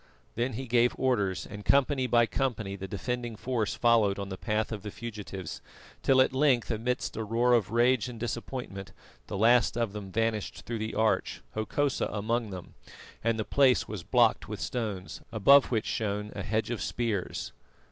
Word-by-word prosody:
Then 120 +2 -1
he 130 +4 -4
gave 120 0 +3
orders, 105 -8 0
and 105 0 -9
company 135 0 +3
by 120 0 +4
company 115 -6 -2
the 95 0 -6
defending 120 +4 -3
force 115 -2 -2
followed 115 -4 +3
on 100 -1 -5
the 95 - -4
path 110 +2 -1
of 105 -2 -4
the 105 - -6
fugitives, 105 -5 -7 0.4
till 130 -1 +5
at 130 - +2
length 130 -4 +2
amidst 125 +3 -2
a 110 - -2
roar 115 +3 +2
of 115 -6 +3
rage 120 +2 +3
and 120 -2 -8
disappointment, 115 -4 -5 0.3
the 100 - -4
last 120 +3 +4
of 115 -4 -1
them 100 -2 -7
vanished 115 0 -2
through 115 -1 -3
the 110 +1 -4
arch, 110 0 +1
Hokosa 130 +6 0
among 110 +2 -1
them, 90 -3 -8 0.5
and 115 0 +1
the 110 - -2
place 135 -3 +3
was 105 -3 -5
blocked 115 +1 +3
with 105 -2 -5
stones, 105 -6 -4
above 135 +6 +6
which 110 -3 0
shone 105 -1 -2
a 100 - -4
hedge 110 +4 -1
of 120 - -3
spears. 110 -6 -2
115 Hz, 180 wpm, -29 LUFS, 105-125 Hz, 0.5 s, above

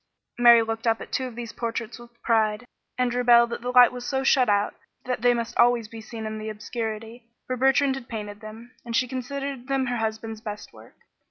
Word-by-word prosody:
Mary 235 -1 +7
looked 225 +1 -4
up 225 0 +2
at - - -10
two 260 - -1
of 245 - -10
these 235 -1 -7
portraits 230 0 -4
with 235 0 -16
pride, 220 0 +1 0.3
and 250 -1 +1
rebelled 240 -1 +5
that - - -4
the 245 - -4
light 250 -1 +7
was 250 -1 -7
so 265 +1 -1
shut 255 -3 +4
out 205 0 +2 0.3
that 250 -3 -2
they 245 0 +5
must 235 -1 -2
always 240 -2 +4
be 225 +1 -10
seen 220 0 -8
in 215 0 -5
the 215 0 -5
obscurity, 225 +2 -6 0.2
for 255 - -2
Bertrand 270 +2 +3
had 265 -2 -8
painted 210 -3 -6
them, 225 +3 -11
and 235 -1 -4
she 255 - +2
considered 265 0 -5
them 270 -1 0
her 245 -1 -2
husband's 220 0 -4
best 210 -2 -8
work. - - -16
235 Hz, 220 wpm, -25 LUFS, 220-250 Hz, 0.3 s, Mary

